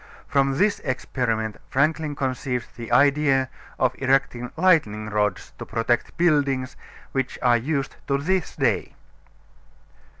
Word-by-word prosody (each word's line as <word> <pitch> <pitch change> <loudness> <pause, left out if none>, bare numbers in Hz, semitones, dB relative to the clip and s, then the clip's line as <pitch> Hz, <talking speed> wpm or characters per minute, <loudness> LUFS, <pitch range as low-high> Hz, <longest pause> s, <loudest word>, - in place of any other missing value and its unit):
From 135 -1 +2
this 205 +3 +2
experiment 120 -4 -2
Franklin 150 +2 +1
conceived 130 -2 -3
the 115 -1 -8
idea 135 0 +3 0.3
of 130 -1 +2
erecting 130 -2 +1
lightning 110 - +2
rods 105 -2 -1
to - - -6
protect 115 +1 -1
buildings, 140 -6 +1 0.4
which 135 -1 -2
are 120 -1 +5
used 140 +3 -2
to 140 - +2
this 180 +5 -1
day. - - 0
135 Hz, 120 wpm, -24 LUFS, 120-145 Hz, 0.4 s, are